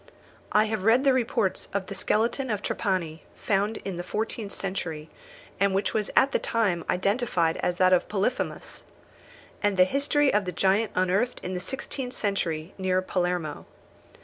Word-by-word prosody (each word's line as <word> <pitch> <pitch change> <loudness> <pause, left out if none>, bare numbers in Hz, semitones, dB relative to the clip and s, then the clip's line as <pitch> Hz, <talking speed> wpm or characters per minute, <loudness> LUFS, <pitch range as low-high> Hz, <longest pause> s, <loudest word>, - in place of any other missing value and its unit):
I 210 - +5
have 215 -3 -2
read 230 +5 +5
the 275 -2 +5
reports 230 -6 0
of 200 -1 0
the 200 - -7
skeleton 235 +6 0
of 210 -2 -2
Trapani, 170 -6 -1
found 205 +2 0
in 190 -3 -3
the 175 - -3
fourteenth 215 +1 -3
century, 165 -5 -4 0.5
and 200 -1 +2
which 195 - 0
was 215 -2 0
at 275 - +5
the - - +1
time 200 -8 0
identified 190 -3 +1
as 180 - 0
that 185 +1 +4
of 180 - +3
Polyphemus; 210 +5 -2 0.8
and 205 -2 +1
the 185 - +8
history 280 +6 +2
of 205 -1 +2
the 180 - -2
giant 195 +5 +2
unearthed 190 +7 +1
in 185 - -3
the 180 - -2
sixteenth 255 +5 -5
century 170 -5 -2
near 185 -1 +2
Palermo. 175 -5 -2
195 Hz, 165 wpm, -26 LUFS, 180-225 Hz, 0.8 s, the